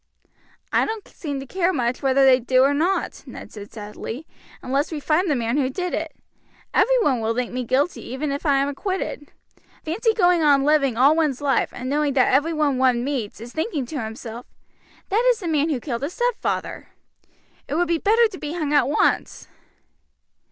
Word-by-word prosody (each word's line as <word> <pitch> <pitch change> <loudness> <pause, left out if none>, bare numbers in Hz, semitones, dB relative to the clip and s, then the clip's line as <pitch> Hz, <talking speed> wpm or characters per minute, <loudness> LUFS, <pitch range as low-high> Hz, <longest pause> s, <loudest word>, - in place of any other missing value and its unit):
"I - - +4
don't 440 -2 -5
seem 285 -4 -5
to - - -8
care 365 +5 0
much 250 -6 -1
whether 270 0 +3
they 260 -1 +6
do 255 +1 +3
or 280 +1 +3
not," 340 +7 -1
Ned - - -10
said 205 -1 -10
sadly, 220 +6 -7 0.4
"unless 275 +5 -1
we 310 - -3
find 320 +5 +1
the 295 - +2
man 235 +1 -1
who 265 -3 +1
did 360 +6 -4
it. - - -3 0.6
Every - - +4
one 255 - +1
will 225 +1 -1
think 250 -1 -2
me 250 0 -2
guilty 275 +8 0
even 275 +4 -3
if 280 +1 -4
I 285 -4 +3
am 275 +1 +1
acquitted. 295 -1 -4 0.5
Fancy 440 +8 0
going 355 -4 +4
on 285 -3 +4
living 275 -5 +2
all 275 +5 +5
one's 300 -6 +1
life 280 -2 +1
and 250 - -7
knowing 290 +1 0
that 255 -2 +3
everyone 295 -1 +2
one 250 -2 +3
meets 255 -8 -3
is 235 +2 -10
thinking 315 - -2
to 270 +2 -5
himself, 225 +2 -8 0.6
'That 430 +5 +2
is - - +3
the 360 - -5
man 310 -1 +1
who 285 -5 -1
killed 235 -2 -4
his 290 +6 -3
stepfather' 485 -1 -2 0.8
it 285 - -3
would 350 +2 +1
be 335 0 +1
better 455 +5 +4
to 375 - -10
be 300 0 -5
hung 310 -4 -2
at 285 -4 +4
once." 295 - 0
285 Hz, 195 wpm, -22 LUFS, 255-330 Hz, 0.8 s, they